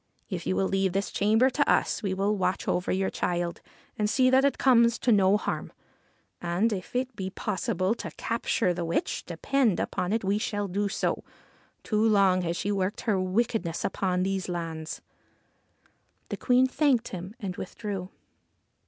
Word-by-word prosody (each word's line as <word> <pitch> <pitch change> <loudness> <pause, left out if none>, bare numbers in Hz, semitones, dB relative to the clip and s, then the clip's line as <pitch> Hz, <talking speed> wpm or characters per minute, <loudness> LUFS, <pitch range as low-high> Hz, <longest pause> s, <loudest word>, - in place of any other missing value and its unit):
If 175 -2 -4
you 185 - +1
will 195 - +1
leave 195 -1 +1
this 195 +1 -1
chamber 220 +6 +3
to 285 +2 +1
us - - +1
we 195 - -1
will 200 +2 +1
watch 185 -1 -1
over 180 - 0
your 190 0 0
child 175 -1 -2 0.4
and 210 0 +1
see 255 +2 +3
that 265 +1 +5
it 280 - +2
comes 235 -3 +4
to 240 - +1
no 200 -1 +5
harm. - - -4 0.7
And, 175 +6 +1
if 190 +4 -6
it 255 -1 -1
be 190 -2 -4
possible 195 -1 -1
to - - -6
capture 230 -4 0
the 175 0 -3
witch, 165 0 -1
depend 220 +5 +1
upon 180 - -2
it 225 0 0
we 200 +2 +1
shall 205 -1 -2
do 200 +2 -1
so. - - -1 0.6
Too 215 -1 0
long 200 -4 +4
she 195 - -3
has 205 - +1
worked 195 +2 -1
her 210 -5 +1
wickedness 185 -2 -1
upon 185 -2 0
these 190 -1 -2
lands.' 165 -2 -5 1.3
The - - -3
Queen 250 0 +4
thanked 260 -3 +2
him 185 +3 -7
and 195 -5 -4
withdrew. 195 -1 -5
195 Hz, 170 wpm, -27 LUFS, 185-225 Hz, 1.3 s, that